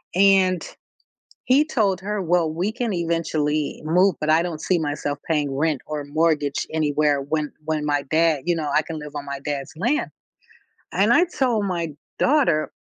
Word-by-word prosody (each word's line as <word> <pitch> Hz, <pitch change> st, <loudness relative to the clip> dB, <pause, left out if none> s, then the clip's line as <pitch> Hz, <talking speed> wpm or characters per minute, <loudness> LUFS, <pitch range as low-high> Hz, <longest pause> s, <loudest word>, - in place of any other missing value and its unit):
And 190 Hz, -2 st, +4 dB, 0.8 s
he 270 Hz, +4 st, +5 dB
told 210 Hz, -, +1 dB
her, 210 Hz, +1 st, -2 dB
"Well, 170 Hz, -2 st, +1 dB
we 180 Hz, +7 st, -1 dB
can 235 Hz, -2 st, -2 dB
eventually 160 Hz, -3 st, -1 dB
move, 180 Hz, +3 st, +3 dB
but 155 Hz, -, -2 dB
I 160 Hz, +1 st, +5 dB
don't 165 Hz, -3 st, -5 dB
see 185 Hz, -, +1 dB
myself 145 Hz, -2 st, -2 dB
paying 150 Hz, -4 st, 0 dB
rent, 150 Hz, -1 st, 0 dB
or 150 Hz, -1 st, -4 dB
mortgage 150 Hz, -1 st, 0 dB
anywhere 150 Hz, -2 st, +1 dB
when 150 Hz, +1 st, -2 dB
when 155 Hz, -1 st, -1 dB
my 145 Hz, -1 st, 0 dB
dad 160 Hz, -2 st, +3 dB
you 175 Hz, -1 st, +2 dB
know, 155 Hz, -3 st, -2 dB
I 155 Hz, -, +4 dB
can 160 Hz, +1 st, -6 dB
live 150 Hz, 0 st, -9 dB
on 145 Hz, -1 st, -5 dB
my 140 Hz, -1 st, -5 dB
dad's 145 Hz, +1 st, -4 dB
land." 245 Hz, -, 0 dB, 0.8 s
And -, -, +3 dB
I 350 Hz, -, +5 dB
told 250 Hz, -, 0 dB
my 170 Hz, -4 st, -2 dB, 0.3 s
daughter, 255 Hz, -, +2 dB
160 Hz, 175 wpm, -23 LUFS, 150-185 Hz, 0.8 s, he